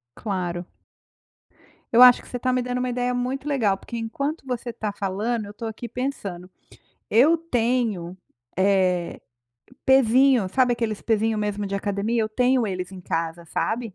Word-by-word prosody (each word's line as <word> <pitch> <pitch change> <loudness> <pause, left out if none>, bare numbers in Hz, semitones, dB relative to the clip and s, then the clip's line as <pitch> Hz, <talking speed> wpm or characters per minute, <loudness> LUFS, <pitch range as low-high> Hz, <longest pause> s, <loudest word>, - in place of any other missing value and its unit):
Claro. 180 -4 -3 1.3
Eu 235 - +6
acho 250 -1 +8
que - - -17
você 245 - -4
está 255 +1 0
me 255 - +1
dando 250 0 -3
uma 250 0 -1
ideia 245 0 -1
muito 255 +3 -3
legal, 235 -9 +2
porque 235 - -8
enquanto 275 +7 -3
você 250 -1 -4
está 220 -3 -4
falando 205 +3 -2
eu 200 - -9
estou 225 +2 -6
aqui 225 +2 -7
pensando, 205 -8 -5 0.6
eu 280 +10 +5
tenho, 235 - -1 0.4
eh, 185 -3 +1 0.7
pesinho. 260 -3 +5
Sabe 255 +2 +3
aqueles 225 -3 -3
pesinho 220 -1 +1
mesmo 210 -1 -2
de 200 - -4
academia? 205 +3 -1
Eu 215 - -1
tenho 250 +1 +2
eles 185 -1 -4
em 185 - -9
casa, 165 0 -3
sabe. 225 +4 -2
225 Hz, 160 wpm, -24 LUFS, 200-250 Hz, 1.3 s, acho